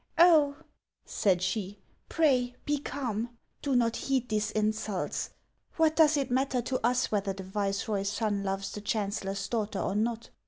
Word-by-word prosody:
" - - -39
Oh! 315 -4 +6 0.3
" - - -62 0.2
said 185 -4 +1
she, 200 +1 -2 0.2
" - - -40
pray 255 -6 +2
be 295 0 +1
calm; 240 -4 -4 0.2
do 275 -2 0
not 235 -2 +3
heed 260 -2 -1
these 215 0 0
in 215 0 +1
sults. 215 -3 -3 0.5
Wha,t 320 -1 +4
does 310 -2 +5
it 275 -3 -1
matter 260 0 +1
to 255 0 -2
us 250 +2 +2
whether 200 -2 0
the 190 0 -7
viceroy's 200 +1 -1
son 205 -2 -1
loves 195 0 -2
the 210 - -6
chancellor's 200 -2 -2
daughter 215 -3 -2
or - - -1
not?" 225 +2 -1
220 Hz, 180 wpm, -29 LUFS, 200-260 Hz, 0.5 s, Oh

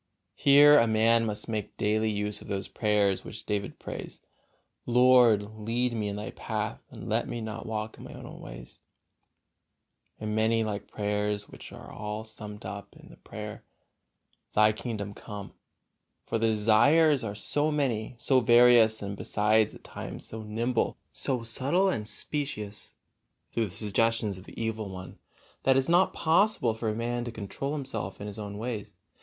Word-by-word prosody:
Here 145 +1 +7
a 115 - +4
man 115 +1 +3
must 105 -1 -4
make 110 -2 -4
daily 110 +1 +1
use 105 0 -2
of - - -12
those 100 -1 -3
prayers 105 -3 +1
which - - -9
David 100 -1 -2
prays: - - -7 0.7
"Lord, 125 -3 +6 0.2
lead 120 +3 0
me 110 -2 -1
in 100 - -3
Thy 105 +1 -5
path, - - -4
and - - -9
let - - 0
me 120 - -4
not 110 0 -6
walk 110 0 -4
in - - -10
my - - -9
own - - -10
ways," - - -10 1.4
and 105 0 -3
many 110 +1 +2
like 105 -2 -4
prayers, 105 0 -1
which - - -11
are - - -11
all 105 0 -5
summed 105 -1 -9
up 100 +1 -7
in - - -15
the - - -15
prayer, - - -8 0.9
"Thy 105 0 +6
kingdom 105 -2 -5
come." 100 -1 -8 0.7
For 115 - -1
the 115 - +2
desires 125 +7 +4
are 100 -2 -4
so 145 +8 +1
many, 130 -6 -1
so 130 +2 +3
various, 120 -2 +6
and 100 0 -4
besides 105 +2 +2
at - - -15
times - - -7
so 110 - -7
nimble, 115 +3 -1 0.2
so 125 -4 -2
subtile 140 +12 +1
and 105 - -2
specious, 105 -4 -4 0.6
through 115 -2 0
the 95 - -11
suggestions 110 -1 0
of 95 - -14
the - - -11
evil 110 -2 -2
one, 95 -1 -9 0.4
that 135 - +4
it - - +5
is 135 - -1
not 175 +2 +4
possible 165 - +2
for 110 0 -2
a 105 - -2
man 120 +1 -2
to 120 - -4
control 115 +6 -4
himself 115 -10 -4
in 100 - -6
his 105 0 -7
own 100 -1 -6
ways. 105 -3 -5
110 Hz, 170 wpm, -28 LUFS, 105-120 Hz, 1.4 s, Here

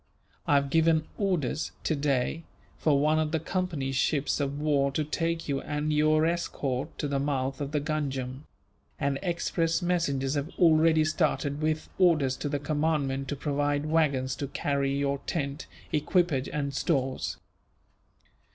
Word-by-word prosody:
I 145 - +4
have 140 -1 +2
given 160 -1 +3
orders, 175 - -1
today, 140 0 0 0.4
for 145 -3 +3
one 155 +2 +3
of 155 -1 0
the 160 - +1
Company's 160 -6 -2
ships 145 +3 +1
of 140 0 -2
war 145 -2 +2
to 155 - 0
take 165 +2 -2
you 140 -2 -1
and 150 +1 -2
your 155 +1 +3
escort 150 -4 -2
to 150 - -2
the 140 -1 0
mouth 135 -1 -1
of 140 0 -3
the 150 - +1
Ganjam; 140 -3 -3 0.5
and 140 -1 0
express 170 -2 0
messengers 145 -7 0
have 145 +1 -2
already 160 -2 +5
started, 155 -2 0
with 155 0 0
orders 155 -8 +4
to 145 - -3
the 145 - 0
commandant 145 -2 0
to 145 - -2
provide 145 0 0
waggons 140 -5 +1
to 140 - -3
carry 140 0 -1
your 140 0 0
tent, 140 -2 -3 0.3
equipage 155 -2 +1
and 140 -2 -2
stores. 135 -4 -1
145 Hz, 150 wpm, -28 LUFS, 140-155 Hz, 0.5 s, already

